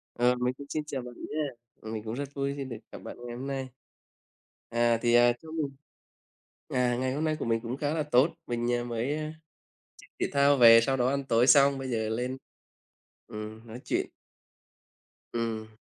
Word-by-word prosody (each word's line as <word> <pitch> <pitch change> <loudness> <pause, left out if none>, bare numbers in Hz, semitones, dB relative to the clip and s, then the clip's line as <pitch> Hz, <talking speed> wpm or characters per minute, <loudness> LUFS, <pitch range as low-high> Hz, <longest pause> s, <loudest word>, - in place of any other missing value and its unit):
Ờ, 125 +1 +3
mình 125 +1 0
cũng 140 - -9
xin 155 - -2
chào 135 -3 -3
bạn 125 0 -9 0.2
nha. 155 +1 -1 0.4
Ừm, 110 0 -6
mình 110 -1 -4
cũng 110 0 -5
rất 140 +2 -4
vui 140 0 -1
khi 140 - -3
được 120 -4 -6
gặp - - -8
bạn - - -8
ngày 120 -1 -6
hôm 130 +2 -5
nay. 135 -1 -3 1.0
À, 120 0 +2
thì, 120 -1 +3
à, 120 0 +6
cho 160 - -12
mình 155 -3 -2 1.0
à, 125 -4 +1
ngày 130 +1 -1
hôm 150 +3 -1
nay 155 -1 +1
của - - -3
mình 115 -1 +1
cũng 120 +2 -4
khá 145 +1 -1
là 160 - 0
tốt, 145 0 +4 0.2
mình, 120 0 -1
à, 120 0 0
mới, 120 +4 -2
ờ, 155 - -3 0.8
chơi - - -16
thể - - +1
thao 140 0 +4
về 115 -2 +9
sau 135 +3 +1
đó 125 -1 +2
ăn 140 +1 -1
tối 120 -1 +3
xong, 140 +1 +6
bây 135 -1 -5
giờ 110 -3 -1
lên, 125 +4 -2 0.9
ừm, 110 +1 -8
nói 115 +2 -9
chuyện. - - -1 1.3
Ừm. 115 -2 -2
125 Hz, 205 wpm, -29 LUFS, 115-140 Hz, 1.3 s, về